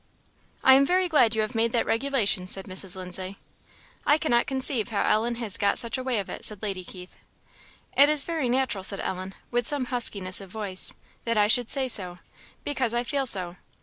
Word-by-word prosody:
"I 265 - +7
am 270 +1 +5
very 365 +5 +1
glad 250 -9 +3
you 220 - +1
have 215 +4 -5
made 230 0 0
that 235 - +1
regulation," 225 -7 0
said 190 +1 0
Mrs. 190 -1 -1
Lindsay. 185 +1 -5 0.7
"I 295 - +3
cannot 240 -7 0
conceive 265 -4 -1
how 210 -3 -1
Ellen 230 +3 +1
has 230 -4 0
got 200 - +1
such 235 - +1
a 260 - -3
way 255 -3 -1
of 200 - -3
it," - - -8
said 210 -1 +5
Lady 195 -3 -4
Keith. 180 0 -12 0.8
"It 285 +1 +6
is 300 -2 +3
very 315 -6 -3
natural," 250 -6 -1
said 195 +1 +2
Ellen, 185 +1 -5 0.2
with 240 -1 0
some 285 -3 +1
huskiness 200 -6 +1
of 195 - -12
voice, 195 -2 -2 0.3
"that 230 -1 -1
I 210 - +4
should 230 +2 +1
say 270 -2 +1
so, 185 -7 0 0.5
because 255 -5 -2
I 240 - 0
feel 275 +1 -1
so." 180 -5 +2
230 Hz, 205 wpm, -25 LUFS, 195-260 Hz, 0.8 s, I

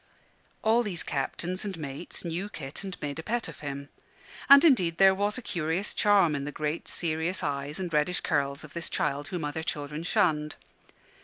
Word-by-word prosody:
All 225 +2 +4
these 200 -7 -1
captains 175 +7 -3
and 195 -4 -4
mates 150 +4 -5
knew 175 +5 -3
Kit 140 -1 -7
and 190 -2 -6
made 145 +1 -3
a - - -2
pet 235 +6 -1
of - - -10
him: 140 -1 -6 0.6
and 280 +3 +10
indeed 180 - +4
there 195 +1 +7
was 205 +3 0
a 255 - -7
curious 170 +1 -2
charm 200 -6 +4
in 140 -1 -2
the 145 - -4
great 150 +2 -3
serious 170 +2 -1
eyes 145 +1 -3
and 180 -3 -4
reddish 150 +4 +1
curls 140 -3 0
of 150 - -11
this 170 -1 -1
child 145 0 -1
whom 175 -3 -3
other 150 +2 -3
children 150 -1 -3
shunned. 155 -3 +1
165 Hz, 185 wpm, -28 LUFS, 145-190 Hz, 0.6 s, and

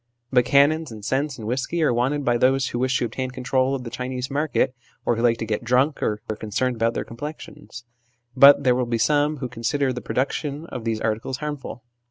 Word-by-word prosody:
But 125 -2 +4
cannons, 145 +2 +3
and 105 -2 -9
scents, 140 +2 -1
and 110 - -8
whisky, 135 +8 -1
are 150 - +3
wanted 135 +4 0
by 120 - +3
those 130 +2 +2
who 120 - -3
wish 130 +1 +1
to - - 0
obtain 130 +3 -4
control 130 +1 0
of 130 - -5
the 115 - -7
Chinese 125 0 -4
market, 145 -2 0 0.3
or 120 - +2
who 115 - -2
like 120 -1 +3
to 115 - -4
get 110 +1 -2
drunk, 130 +5 +2
or 105 0 -1
are 110 - -3
concerned 115 +4 -2
about 115 0 0
their - - -2
complexions; 145 0 -9 0.5
but 140 +2 +8
there 125 -2 +4
will 125 0 -1
be 115 -1 0
some 145 +6 +2
who 130 -2 -4
con 120 -2 -11
sider 140 +1 +1
the 125 - -5
production 140 +3 -2
of 125 -8 -7
these 115 -1 -1
articles 115 +4 -2
harmful. 145 -5 -6
130 Hz, 225 wpm, -23 LUFS, 120-140 Hz, 0.5 s, but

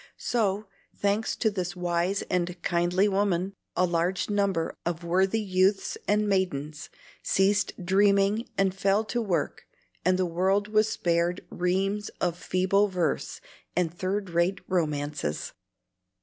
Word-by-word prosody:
So, 210 -3 0 0.3
thanks 205 +2 0
to 220 - +1
this 185 -2 -3
wise 175 +2 0
and 180 -1 -2
kindly 175 +3 +2
woman, 195 -2 0 0.2
a 180 - +3
large 175 +3 0
number 200 -5 0
of 170 0 -3
worthy 190 +5 +2
youths 195 -1 +1
and 210 +1 +2
maidens 155 -6 -1 0.3
ceased 200 +2 +2
dreaming 200 +3 +3
and 195 -1 +2
fell 195 +2 +2
to 240 +2 -1
work, 195 -6 -2 0.4
and 185 +1 +3
the 185 - +1
world 190 +4 +1
was 215 0 +3
spared 175 -3 0
reams 195 +4 0
of 175 -2 0
feeble 185 +3 +2
verse 180 -5 -2 0.3
and 175 -2 +1
third 185 +2 -2
rate 175 +3 +1
romances. 150 - -2
185 Hz, 130 wpm, -27 LUFS, 175-200 Hz, 0.4 s, a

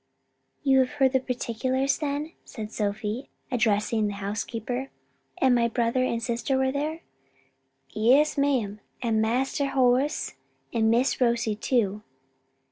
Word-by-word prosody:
"You 270 -2 +5
have 255 -1 +1
heard 270 -2 +3
the 265 - +3
particulars 260 +2 -1
then?" 295 +2 -3
said 215 -2 -7
Sophie, 210 +4 -3 0.2
addressing 220 -2 +1
the 205 - -4
housekeeper. 225 +5 -4 0.5
"And 260 -1 +4
my 235 -1 +3
brother 235 +2 +1
and 230 -2 -1
sister 240 +3 0
were 265 0 +2
there?" 305 +4 -3 0.9
"Yes, 260 +8 +4
ma'am, 255 -8 0 0.2
and 225 -2 +2
Master 260 +5 0
Horace, 260 +3 +2 0.4
and 220 -1 +2
Miss 250 +4 +2
Rosie 235 -3 +2
too. 210 -3 0
245 Hz, 125 wpm, -26 LUFS, 220-265 Hz, 0.9 s, You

